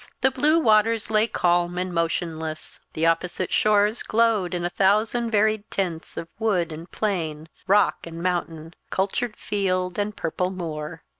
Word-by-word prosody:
The 265 +2 +4
blue 305 +4 +3
waters 220 -5 +3
lay 215 +1 +3
calm 175 -3 +1
and 180 0 -2
motionless. 165 -2 -3
The 160 - 0
opposite 175 +2 0
shores 210 +2 +3
glowed 215 -6 +1
in 175 0 -2
a - - 0
thousand 215 +5 +2
varied 215 -1 +1
tints 175 -4 -3
of 165 - -4
wood 190 -7 +1
and 160 +3 -8
plain, 160 -7 -3 0.2
rock 205 -3 +3
and 165 0 -8
mountain, 170 -2 -3 0.2
cultured 215 +4 -1
field 185 -2 -1
and 205 +1 -2
purple 180 +3 -1
moor. 165 -3 -6
185 Hz, 150 wpm, -24 LUFS, 170-215 Hz, 0.2 s, The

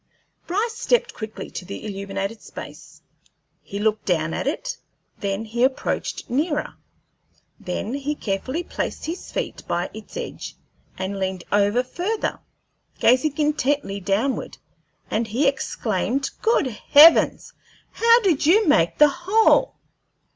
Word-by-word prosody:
Bryce 440 +6 -1
stepped 485 +1 +1
quickly 220 -1 -7
to - - -6
the 195 +4 -8
illuminated 195 +1 -4
space. - - -11 0.6
He 200 - -7
looked 215 +1 0
down 165 -3 0
at - - -3
it; 290 - -3 0.4
then 200 +2 -2
he 235 +2 -1
approached 260 0 -1
nearer; 295 +4 -1 0.9
then 190 +6 -4
he 285 +2 -2
carefully 255 - -3
placed - - -4
his 335 +3 -6
feet - - -4
by 175 +1 -2
its 220 - -10
edge - - -6 0.4
and 190 +1 -3
leaned 190 -2 -2
over 205 +4 +3
further, 365 - -3 0.6
gazing 260 +4 +3
intently 290 -8 0
downward, 205 +8 -1 0.5
and 225 +1 0
he 250 +7 +1
exclaimed, 255 -1 -1
"Good 450 -8 +3
heavens! 290 +7 +5 0.4
How 465 +1 +5
did 335 -8 +2
you 415 +5 +5
make 170 - +3
the 300 0 +7
hole?" 405 - +3
255 Hz, 125 wpm, -23 LUFS, 200-325 Hz, 0.9 s, the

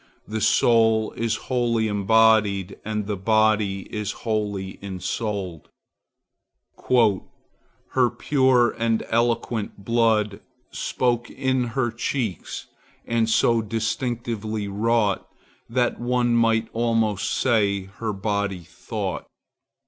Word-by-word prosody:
The 110 +1 -3
soul 110 -1 +3
is 115 -1 -1
wholly 120 -3 +1
embodied, 105 -2 +3
and 105 -1 -3
the 105 0 -2
body 105 -1 +2
is 105 -2 -2
wholly 105 -4 -2
ensouled:— 95 -2 -4 2.2
"Her 125 -2 +3
pure 130 -3 +3
and 115 -1 +1
eloquent 115 -3 -1
blood 110 -3 +2 0.3
Spoke 120 -2 -1
in 130 -2 0
her 120 -3 +1
cheeks, 120 - -3 0.4
and 115 -1 +1
so 115 +1 +3
distinctly 110 -1 -3
wrought, 105 0 0 0.4
That 120 +1 0
one 120 0 +1
might 115 -1 +2
almost 115 -3 0
say 100 -6 +1 0.2
her 115 -2 -1
body 100 -2 -2
thought." - - -5
110 Hz, 95 wpm, -24 LUFS, 105-120 Hz, 2.2 s, soul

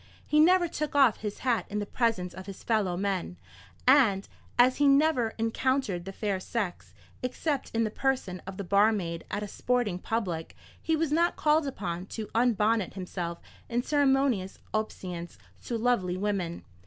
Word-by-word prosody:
He 300 - +2
never 350 +2 +5
took 305 -3 -4
off 270 -6 +5
his 210 -1 -5
hat 240 -3 +1
in 210 - -3
the 205 - -1
presence 200 -6 0
of 190 +2 -9
his 195 - -9
fellow 205 -6 +1
men; 190 -2 -2 0.5
and 230 -8 +5 0.3
as 250 +1 +5
he 290 0 +4
never 275 -5 +3
encountered 225 -4 0
the 195 - -5
fair 200 -1 -2
sex, 195 -2 -4 0.3
except 270 +3 -2
in 230 0 +1
the 215 - -1
person 255 -9 -1
of 190 0 -6
the 200 - -3
barmaid 200 -3 +2
at 205 +1 -2
a - - -4
sporting 240 -4 -1
public, 180 -7 -3 0.3
he 320 - +1
was 315 -1 0
not 340 +3 +2
called 300 0 +2
upon 185 -7 -4
to 220 0 -6
unbonnet 225 -4 +2
himself 175 -2 -4 0.3
in 240 0 0
ceremonious 270 -9 +2 0.2
obeisance 180 -5 -4 0.3
to 235 - -2
lovely 220 -7 +1
woman. 185 -4 -2
220 Hz, 165 wpm, -28 LUFS, 190-260 Hz, 0.5 s, never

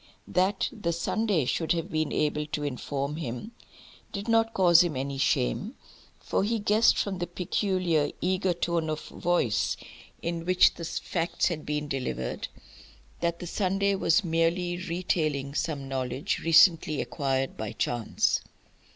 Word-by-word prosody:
That 185 +3 +1
the 175 -6 -2
Sunday 180 - 0
should 160 +6 0
have 170 0 -3
been 155 -1 0
able 150 0 0
to 150 -1 -3
inform 140 +1 -3
him 130 - -5 0.6
did 200 +2 -5
not 225 0 +3
cause 175 -3 +6
him 165 -6 -2
any 135 +1 -3
shame, - - 0 0.4
for - - -1
he 225 +3 +1
guessed 215 +2 +4
from 195 -3 -1
the 175 - -2
peculiar 175 -3 0
eager 185 0 +1
tone 170 -2 -1
of 155 0 -3
voice 175 -11 0 0.5
in 170 0 -2
which 185 +1 +5
the 170 - -7
facts 170 +2 -1
had 160 -3 -5
been 150 0 -2
delivered, 125 - -3 0.7
that 170 0 0
the 175 - -7
Sunday 195 +2 +1
was 195 +1 +3
merely 170 +1 +1
retailing 165 -6 -1
some 145 -3 -2
knowledge 130 +1 -2
recently 165 -2 +5
acquired 135 -1 -1
by 110 -1 -4
chance. 120 -2 0
165 Hz, 140 wpm, -28 LUFS, 145-185 Hz, 0.7 s, cause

